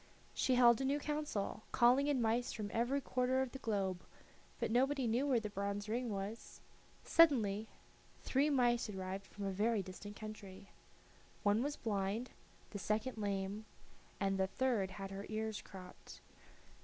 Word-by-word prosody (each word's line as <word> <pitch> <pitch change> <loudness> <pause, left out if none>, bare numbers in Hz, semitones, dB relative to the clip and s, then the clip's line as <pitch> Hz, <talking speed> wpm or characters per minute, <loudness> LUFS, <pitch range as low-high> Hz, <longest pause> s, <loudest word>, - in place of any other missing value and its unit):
She 255 - +2
held 240 -1 +6
a - - 0
new 275 +2 +2
council, 295 -10 -2
calling 250 +4 +5
in 270 -5 +2
mice 230 +2 +1
from 210 -2 -4
every 245 +5 +1
quarter 255 0 +1
of 260 - -5
the 270 - -7
globe, 195 -6 -1 0.6
but - - -1
nobody 265 +2 +2
knew 240 +5 +1
where 255 -4 +3
the 210 -2 -5
bronze 200 +1 -3
ring 240 +3 -1
was. 205 +2 -5 0.4
Suddenly 225 -10 +4 0.6
three 280 +3 +2
mice 240 -5 +2
arrived 190 0 -5
from 205 -1 -7
a 195 - -1
very 210 +2 +1
distant 200 +3 -9
country. 200 -3 -9 0.7
One 205 +1 +3
was 290 +2 -1
blind, 210 +2 -2 0.4
the 205 - -5
second 220 +4 -1
lame, 200 +1 -2 0.5
and 195 -1 0
the 190 - +2
third 230 -3 0
had 195 -1 -6
her 195 +1 -6
ears 220 0 -3
cropped. 185 -2 -12
220 Hz, 155 wpm, -36 LUFS, 200-255 Hz, 0.7 s, held